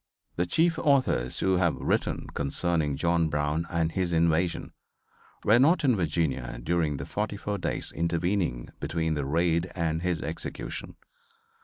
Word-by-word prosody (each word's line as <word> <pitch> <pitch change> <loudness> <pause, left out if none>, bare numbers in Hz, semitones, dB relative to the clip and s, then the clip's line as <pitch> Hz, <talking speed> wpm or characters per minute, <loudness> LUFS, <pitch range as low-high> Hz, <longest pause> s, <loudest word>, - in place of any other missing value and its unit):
The 90 +1 0
chief 165 - +2
authors 130 - +2
who 95 -1 +3
have 85 -3 +2
written - - -1
concerning 75 +1 0
John 85 +1 +1
Brown 75 +3 -1
and 85 -1 0
his 90 0 -1
invasion 85 +1 +1 0.7
were 110 +3 +5
not 160 +6 +4
in 130 -4 +4
Virginia 75 - -1
during 80 -3 0
the - - -5
forty 105 0 -3
four 100 0 -3
days - - -2
intervening 85 -5 -1
between 80 +2 -1
the 75 -3 -2
raid 85 +4 +1
and 80 -2 -1
his 90 -2 0
execution. 80 - -5
85 Hz, 145 wpm, -28 LUFS, 80-90 Hz, 0.7 s, were